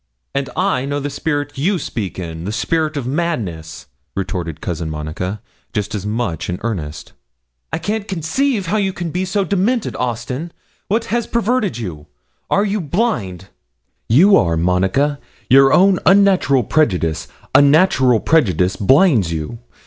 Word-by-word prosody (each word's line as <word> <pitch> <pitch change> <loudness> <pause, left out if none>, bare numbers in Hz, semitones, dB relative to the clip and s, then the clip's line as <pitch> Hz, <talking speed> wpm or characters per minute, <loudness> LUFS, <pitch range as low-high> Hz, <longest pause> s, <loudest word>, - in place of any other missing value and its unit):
'And 140 -1 -2
I 180 -7 0
know 145 +1 -2
the 145 0 -4
spirit 145 -1 -3
you 185 +7 +1
speak 110 - -5
in, 85 -2 -6
the 100 - -3
spirit 155 +5 -1
of 135 - -3
madness,' 100 - -3 0.3
retorted 90 -5 -4
Cousin 85 -3 -4
Monica, 80 +6 -5 0.3
just 105 +1 -2
as 105 -1 -4
much 105 -7 -2
in 90 - -2
earnest. 80 -10 -5 0.6
'I - - -1
can't 205 +5 -3
conceive 200 - -1
how 195 +6 0
you 195 -2 0
can 175 -2 -4
be 180 +3 -1
so 195 +2 0
demented, 200 +6 0
Austin. 125 +6 -3 0.4
What 225 +3 0
has 235 -1 0
perverted 235 - 0
you? 85 -10 -7 0.4
are 200 - +2
you 205 0 -1
blind?' 140 - -2 0.6
'You 180 - +6
are, 85 -2 +1
Monica; 95 - +1 0.3
your 135 +1 +7
own 190 +2 +5
unnatural 190 -9 +4
prejudice 90 - 0 0.3
unnatural 140 - +5
prejudice, 95 - +2
blinds 125 - +3
you. 80 +8 -4
135 Hz, 145 wpm, -18 LUFS, -, 0.6 s, your